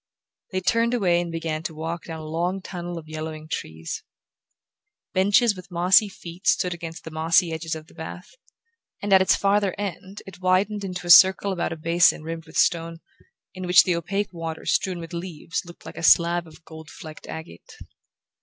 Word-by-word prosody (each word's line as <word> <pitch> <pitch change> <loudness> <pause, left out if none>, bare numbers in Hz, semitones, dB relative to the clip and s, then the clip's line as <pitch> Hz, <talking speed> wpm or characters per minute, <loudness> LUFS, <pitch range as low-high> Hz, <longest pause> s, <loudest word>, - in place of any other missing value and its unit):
They 185 -1 -1
turned 230 +5 +2
away 175 -6 +2
and 170 -1 -5
began 165 -1 -3
to 160 0 -6
walk 165 +2 -5
down 160 -1 -7
a - - -8
long 170 +5 -2
tunnel 175 -2 -6
of 160 -1 -9
yellowing 155 0 -6
trees. 80 - -5 1.1
Benches 205 +4 +3
with 185 0 -12
mossy 180 +4 +4
feet 175 -1 -10
stood 180 -1 +2
against 165 0 -8
the 160 - -8
mossy 165 +2 +2
edges 160 0 -3
of 155 -1 -9
the - - -20
path, 160 +2 -9 0.7
and 205 -1 0
at 190 - +7
its 190 - +4
farther 200 -1 +1
end 195 0 -6
it 190 -1 -12
widened 195 +3 +1
into 180 -2 -5
a 175 - +3
circle 190 +3 +7
about 175 -3 -2
a 165 - -5
basin 165 0 +3
rimmed 165 0 -6
with - - -8
stone, 165 -1 +1 0.6
in 185 -1 -6
which 180 +1 +7
the 180 - 0
opaque 195 +4 -2
water 165 -1 -6
strewn 185 -2 0
with 165 -1 -8
leaves 170 -2 -4
looked 170 0 -14
like - - -10
a - - -5
slab 170 +1 +4
of 160 +1 -17
gold 160 -1 -11
flecked 155 -1 -11
agate. 160 - -10
170 Hz, 190 wpm, -24 LUFS, 160-185 Hz, 1.1 s, at